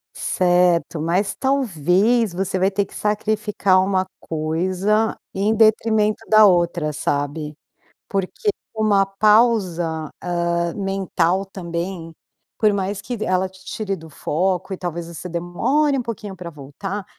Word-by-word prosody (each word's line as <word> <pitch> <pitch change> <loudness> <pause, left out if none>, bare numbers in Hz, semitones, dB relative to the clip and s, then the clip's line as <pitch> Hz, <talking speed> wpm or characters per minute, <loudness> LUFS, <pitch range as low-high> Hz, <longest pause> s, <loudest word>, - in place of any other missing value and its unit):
Certo, 175 -2 +2
mas 180 +5 0
talvez 220 - +2
você 190 +1 -2
vai 190 +2 +2
ter 200 +1 0
que - - -16
sacrificar 210 -2 +1
uma 190 -1 +1
coisa 185 +7 0 0.2
em 205 +3 +1
detrimento 220 0 +3
da 215 -1 +7
outra, 175 -4 +2
sabe? 145 +1 -2 0.5
Porque 195 - -3 0.3
uma 210 -3 +3
pausa, 195 -6 +2
ah, 170 -1 -1
mental 195 -2 0
também, 170 -2 -5 0.5
por 215 -1 +4
mais 195 0 -2
que 245 -3 -5
ela 185 0 +1
te 190 0 -18
tire 200 -3 -3
do 160 -1 -12
foco 185 +5 -1
e 190 - -4
talvez 170 -1 -4
você 170 +1 -7
demore 245 - 0
pouquinho 210 -4 -6
pra 175 -1 -7
voltar, 170 +8 -6
190 Hz, 125 wpm, -21 LUFS, 170-210 Hz, 0.5 s, da